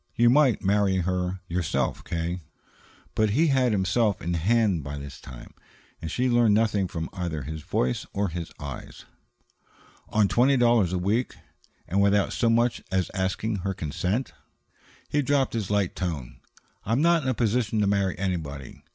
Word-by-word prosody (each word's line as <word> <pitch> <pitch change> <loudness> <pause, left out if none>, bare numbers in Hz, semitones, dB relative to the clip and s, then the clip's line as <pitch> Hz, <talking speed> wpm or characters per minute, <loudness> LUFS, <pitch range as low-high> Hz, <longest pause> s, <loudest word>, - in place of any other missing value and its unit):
"You 120 0 +5
might 135 -4 +4
marry 100 -1 +2
her 90 +1 -1
yourself, 85 -2 -1
K." 85 +2 -3 0.7
But 110 -1 +2
he 150 +10 +3
had 130 -3 +3
himself 100 +1 +1
in 85 +1 -3
hand 95 0 +2
by 70 +1 -6
this 70 0 -9
time, 65 -2 -11 0.5
and 80 - -4
she 125 +10 0
learned 120 -4 +4
nothing 105 -3 +2
from 80 -2 -4
either 85 -5 -3
his 80 +3 -6
voice 65 -3 -1
or 100 -1 -1
his 85 0 -6
eyes. 70 -2 -8 1.0
"On 105 -1 +3
twenty 130 +6 +3
dollars 120 -7 +3
a 95 - 0
week? 105 +8 0 0.5
And 95 +4 +1
without 100 0 +3
so 115 - +1
much 120 +1 +2
as 95 -1 0
asking 100 +3 -1
her 95 +1 -3
consent?" 90 - -2 0.7
He 145 - +1
dropped 140 -1 +1
his 110 -5 -2
light 100 -3 0
tone. 80 -9 -4 0.4
"I'm 115 +8 +1
not 170 -1 +4
in 130 - -2
a 130 - 0
position 115 -1 0
to - - +3
marry 100 -2 +1
anybody. 80 -8 -4
100 Hz, 165 wpm, -26 LUFS, 85-115 Hz, 1.0 s, You